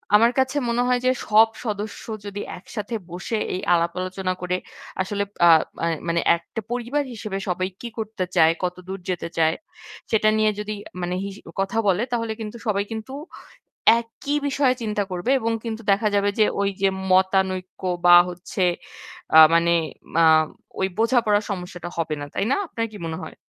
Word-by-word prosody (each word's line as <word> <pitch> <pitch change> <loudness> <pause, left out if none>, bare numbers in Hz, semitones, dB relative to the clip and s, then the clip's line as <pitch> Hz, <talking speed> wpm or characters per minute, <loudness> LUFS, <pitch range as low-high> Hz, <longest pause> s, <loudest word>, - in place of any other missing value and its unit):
আমার 230 +3 +6
কাছে 265 +2 +1
মনে 235 +1 +1
হয় 250 0 +2
যে 255 - +5 0.2
সব 215 +1 +6 0.2
সদস্য 210 -1 -4 0.2
যদি 205 0 -5 0.2
একসাথে 210 +4 -6
বসে 185 +6 -3 0.2
এই 185 - -3
আলাপ 170 0 +2
আলোচনা 185 0 -2
করে 180 0 -1 0.4
আসলে 200 +2 -1 0.2
আ 170 - +8 0.3
মা - - -1 0.2
মানে 170 0 +1
একটা 170 +6 -7
পরিবার 245 +4 -1
হিসেবে 210 -3 -5
সবাই 185 +1 0
কি 240 - -5
করতে 220 -3 -3
চায়, 160 0 +6
কতদূর 180 +2 -4
যেতে 180 -2 -2
চায়, 160 0 +3 0.6
সেটা 215 -1 +4
নিয়ে 215 0 +3
যদি 210 0 -3 0.3
মানে 175 +1 -2
হিস 200 -1 -6 0.2
কথা 195 +3 -1
বলে 195 +3 +3
তাহলে 230 -2 -1
কিন্তু 215 +1 -6
সবাই 200 -1 +1
কিন্তু 220 +4 -6 0.9
একই 235 +5 -4
বিষয়ে 275 -2 +2
চিন্তা 210 -2 -1
করবে 180 +7 -2
এবং 230 +1 0
কিন্তু 225 -1 -4
দেখা 215 +2 +2
যাবে 200 0 +3
যে 215 - +6 0.2
ঐযে 195 -1 +1 0.2
মতানৈক্য 185 0 +1 0.2
বা 175 - +9
হচ্ছে 180 +1 -5 0.7
আ - - +11 0.2
মানে 170 0 +4 0.4
মা 165 - +4 0.6
ঐ - - -1 0.2
বোঝাপড়ার 225 -3 +3
সমস্যাটা 180 -2 -5
হবে 165 -2 -1
না। 145 - -5
তাই - - 0
না? - - +3
আপনার 230 -6 -2
কি - - -9
মনে 160 - -4
হয়? - - -8
200 Hz, 170 wpm, -23 LUFS, 180-225 Hz, 0.9 s, আ